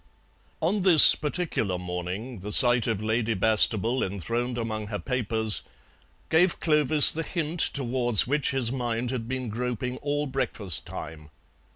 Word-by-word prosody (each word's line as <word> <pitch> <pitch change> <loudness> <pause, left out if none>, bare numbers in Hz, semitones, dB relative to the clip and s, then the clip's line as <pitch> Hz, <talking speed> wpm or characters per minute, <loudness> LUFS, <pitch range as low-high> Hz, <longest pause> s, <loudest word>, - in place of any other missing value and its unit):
On 195 +6 -1
this 180 -5 +8
particular 150 - -4
morning 90 +6 -7
the 105 +3 -8
sight 120 +1 +7
of 110 -2 -3
Lady 110 +1 -2
Bastable 110 +3 +2
enthroned 115 +6 -5
among 110 -2 -5
her 105 -1 -6
papers 110 - -1 0.7
gave 170 +2 +1
Clovis 150 -2 +3
the 165 - -5
hint 165 0 -5
towards 120 -6 +1
which 145 +2 -1
his 130 -4 -2
mind 120 -2 -4
had 120 -3 -6
been 130 0 -5
groping 125 +2 -5
all 145 +1 -4
breakfast 105 - -3
time. 75 -1 -10
120 Hz, 140 wpm, -24 LUFS, 110-135 Hz, 0.7 s, this